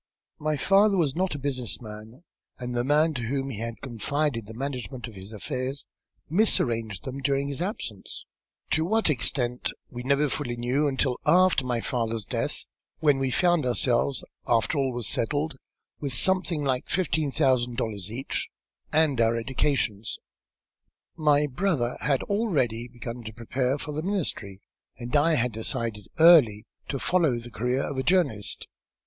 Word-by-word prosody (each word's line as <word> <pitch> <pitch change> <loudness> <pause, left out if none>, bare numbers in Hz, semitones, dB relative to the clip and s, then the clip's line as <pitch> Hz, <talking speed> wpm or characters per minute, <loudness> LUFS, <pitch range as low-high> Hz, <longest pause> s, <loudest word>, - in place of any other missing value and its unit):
My 155 0 0
father 200 +4 +4
was 150 -6 +1
not 185 -2 0
a - - -3
business 130 -4 -2
man, 110 +5 -10 0.3
and 125 -1 -5
the 120 0 0
man 150 +4 +3
to 125 - -3
whom 135 +3 -2
he 105 - -6
had 115 -1 -5
confided 130 -1 -1
the 110 - -9
management 130 -1 -4
of 115 - -11
his 95 +1 -9
affairs 130 +4 -4 0.4
misarranged 115 - +1
them 130 +1 -5
during 140 0 +1
his 140 +3 -4
absence, 150 - -5 0.5
to 160 - +3
what 215 0 +2
extent 125 -2 0 0.2
we 120 - -6
never 140 +3 +2
fully 130 -3 -2
knew 125 +5 +1
until 130 -2 0
after 185 -5 +5
my 120 -2 -1
father's 115 -4 -1
death, - - -2 0.3
when 145 -4 +3
we 135 -1 +1
found 175 +4 +3
ourselves, 125 +1 +1 0.2
after 115 +4 +2
all 135 -1 +1
was 120 -4 -4
settled, 145 +4 -1 0.4
with 140 -3 -3
something 180 +1 +1
like 130 -2 -1
fifteen 160 -5 +1
thousand 130 -5 +2
dollars 105 -3 -3
each, 130 +4 -3 0.4
and 150 -5 +3
our 115 0 +3
educations. 115 -3 0 1.0
My 150 -2 +3
brother 140 -4 0
had 140 -3 +1
already 140 - 0
begun 120 0 -7
to 110 - -6
prepare 125 +4 -1
for 150 - -5
the 150 +1 -3
ministry, 155 - -3 0.4
and 120 +2 -4
I 155 +3 +4
had 125 -2 +1
decided 110 -2 -3
early 145 -11 +7 0.2
to 140 - -2
follow 160 -4 +2
the 120 +1 -7
career 125 +5 0
of 140 - -4
a - - 0
journalist." 170 - +1
130 Hz, 160 wpm, -27 LUFS, 115-150 Hz, 1.0 s, early